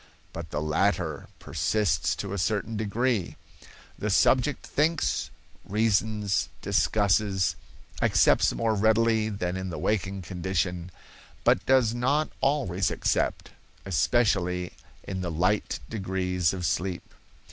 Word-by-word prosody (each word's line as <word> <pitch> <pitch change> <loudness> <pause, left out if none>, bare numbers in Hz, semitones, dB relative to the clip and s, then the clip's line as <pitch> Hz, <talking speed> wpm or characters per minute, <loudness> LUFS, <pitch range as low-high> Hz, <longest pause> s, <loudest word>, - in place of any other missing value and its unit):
But 80 -1 -7
the 75 0 -3
latter 80 -1 0
persists 85 +6 0
to 100 -1 -5
a 100 - -2
certain 110 +3 -1
degree; 110 -1 -1 0.6
the 105 - -2
subject 130 +7 +2
thinks, 160 +3 0 0.3
reasons, 105 -2 0
discusses, 100 -2 +2 0.5
accepts - - +4
more 115 -1 0
readily 110 +1 +2
than 90 -4 -3
in 95 0 -4
the 85 - -5
waking 100 -2 -1
condition, 90 -1 -2 0.5
but - - +3
does 130 -4 +4
not 140 +6 +1
always 100 - +1
accept, - - -1 0.3
especially 90 -3 +1 0.3
in 95 -1 -5
the 90 - -3
light 90 +6 0
degrees 95 -4 -1
of 90 -2 -4
sleep. 90 0 -2
100 Hz, 115 wpm, -27 LUFS, 90-110 Hz, 0.6 s, accepts